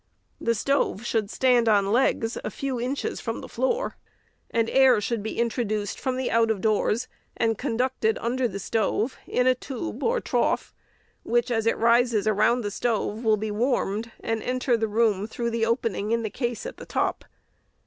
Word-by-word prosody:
The 230 0 +1
stove 240 -3 0
should 220 -4 0
stand 245 -2 +3
on 200 -2 +3
legs 230 -1 +2
a - - -2
few 270 -3 -3
inches 260 +3 -2
from - - -3
the - - -8
floor, - - -1 0.5
and 230 -1 +1
fresh - - -5
air 265 -4 +6
should 225 +1 -2
be 220 - -5
introduced 215 -3 -1
from 260 -1 -2
out 230 0 +3
of 220 -3 0
doors, 215 +3 +1 0.3
and 225 0 +2
conducted 245 -2 0
under 250 +2 0
the 200 - -6
stove 220 +4 -1
in 250 - +1
a 255 - +5
tube 265 +5 -6
or 475 +1 +1
trough, - - 0 0.5
which, 240 +1 0
as 225 -1 0
it - - +2
rises 235 -2 +3
around 215 +3 +3
the 205 -2 -3
stove, 225 0 -1
will 220 -2 +3
be 215 +1 -3
warmed, 225 -1 0
and 225 -1 -2
enter 250 0 +1
the 225 -1 0
room 210 -2 +1
through 235 +1 -3
the 225 -1 0
opening 225 -3 -1
in 230 0 +1
the 215 - -3
case 240 - -3
at - - -6
the - - -9
top. - - -1
230 Hz, 185 wpm, -25 LUFS, 215-250 Hz, 0.5 s, air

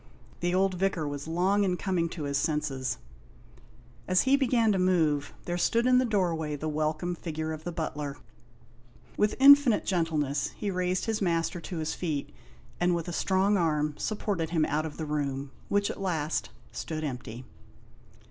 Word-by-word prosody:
The 175 +1 0
old 190 0 +2
Vicar 180 -4 0
was 145 +1 -5
long 185 +5 +2
in 180 -2 +1
coming 175 -4 0
to 160 -2 -6
his 140 -1 0
senses; 140 -4 -1 1.1
as 185 0 +4
he 265 +1 +4
began 240 -5 +3
to 195 - +1
move, 160 -6 +2
there 175 0 -2
stood 230 +6 +2
in 250 0 +5
the 255 - +2
doorway 170 -8 0
the 150 +2 -4
welcome 155 +3 -1
figure 160 -2 -4
of 155 0 -8
the 175 - -2
butler. 150 -4 -4 1.0
With 210 0 +1
infinite 275 -4 +7
gentleness 155 -6 0
he 205 -2 -2
raised 180 0 0
his 220 -2 -1
master 170 -1 0
to 175 - -6
his 155 0 -2
feet, 155 -5 -3 0.5
and 175 0 +2
with 170 0 -3
a - - -4
strong 195 +3 +2
arm 150 -3 +1
supported 200 -5 -2
him 160 -2 +2
out 155 +2 -1
of 150 - -10
the 160 - -3
room, 140 -2 -2 0.2
which 205 0 +1
at - - -8
last, 155 - -1 0.2
stood 155 -1 -4
empty. 125 -3 -5
170 Hz, 170 wpm, -28 LUFS, 150-190 Hz, 1.1 s, infinite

